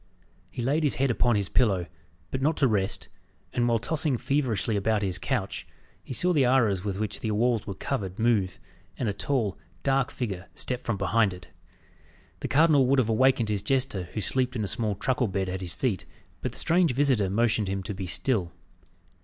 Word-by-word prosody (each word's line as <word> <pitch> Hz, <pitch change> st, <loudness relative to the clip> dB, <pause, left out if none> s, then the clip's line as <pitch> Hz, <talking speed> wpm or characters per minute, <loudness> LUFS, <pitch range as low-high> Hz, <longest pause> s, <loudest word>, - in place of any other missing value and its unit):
He 120 Hz, +7 st, -5 dB
laid 145 Hz, +6 st, +1 dB
his 145 Hz, -, +2 dB
head 135 Hz, -1 st, +1 dB
upon 120 Hz, 0 st, +2 dB
his 100 Hz, -2 st, 0 dB
pillow, 100 Hz, -8 st, +2 dB, 0.5 s
but 130 Hz, -, -2 dB
not 155 Hz, +3 st, +1 dB
to 135 Hz, -, +4 dB
rest, 100 Hz, -3 st, 0 dB, 0.5 s
and 120 Hz, 0 st, +1 dB
while 115 Hz, -1 st, +3 dB
tossing 145 Hz, +3 st, 0 dB
feverishly 120 Hz, -5 st, 0 dB
about 105 Hz, +1 st, +1 dB
his 95 Hz, -3 st, -2 dB
couch, -, -, -2 dB, 0.4 s
he -, -, -11 dB
saw 180 Hz, +8 st, +1 dB
the 145 Hz, -5 st, +4 dB
arras 115 Hz, -7 st, +3 dB
with 100 Hz, -2 st, -3 dB
which 105 Hz, 0 st, -3 dB
the 110 Hz, -, -3 dB
walls 115 Hz, +1 st, +1 dB
were 100 Hz, -, -4 dB
covered, 95 Hz, -5 st, -3 dB
move, 110 Hz, -6 st, +1 dB, 0.4 s
and 125 Hz, -, -1 dB
a 105 Hz, -, 0 dB
tall, 115 Hz, -5 st, -1 dB, 0.2 s
dark 135 Hz, -1 st, +2 dB
figure 100 Hz, -10 st, -4 dB
step 125 Hz, -1 st, -3 dB
from 115 Hz, -4 st, -1 dB
behind 100 Hz, +1 st, +2 dB
it. 90 Hz, -, -13 dB, 0.9 s
The -, -, -3 dB
cardinal 145 Hz, -2 st, +4 dB
would 140 Hz, +2 st, +3 dB
have 120 Hz, -4 st, +2 dB
awakened 120 Hz, 0 st, +3 dB
his 105 Hz, -2 st, 0 dB
jester, 130 Hz, -8 st, 0 dB
who 110 Hz, -, -2 dB
slept 130 Hz, +5 st, 0 dB
in 110 Hz, -, -1 dB
a -, -, -1 dB
small 105 Hz, 0 st, -1 dB
truckle 125 Hz, +3 st, 0 dB
bed 95 Hz, -1 st, -2 dB
at 95 Hz, +1 st, -4 dB
his 90 Hz, -3 st, -4 dB
feet, 115 Hz, -9 st, -1 dB, 0.4 s
but -, -, -3 dB
the -, -, -7 dB
strange 170 Hz, -4 st, +3 dB
visitor 130 Hz, -8 st, +2 dB
motioned 110 Hz, 0 st, +1 dB
him 95 Hz, 0 st, -2 dB
to 105 Hz, -, -4 dB
be 95 Hz, -1 st, -5 dB
still. 95 Hz, -2 st, +2 dB
115 Hz, 200 wpm, -27 LUFS, 100-130 Hz, 0.9 s, to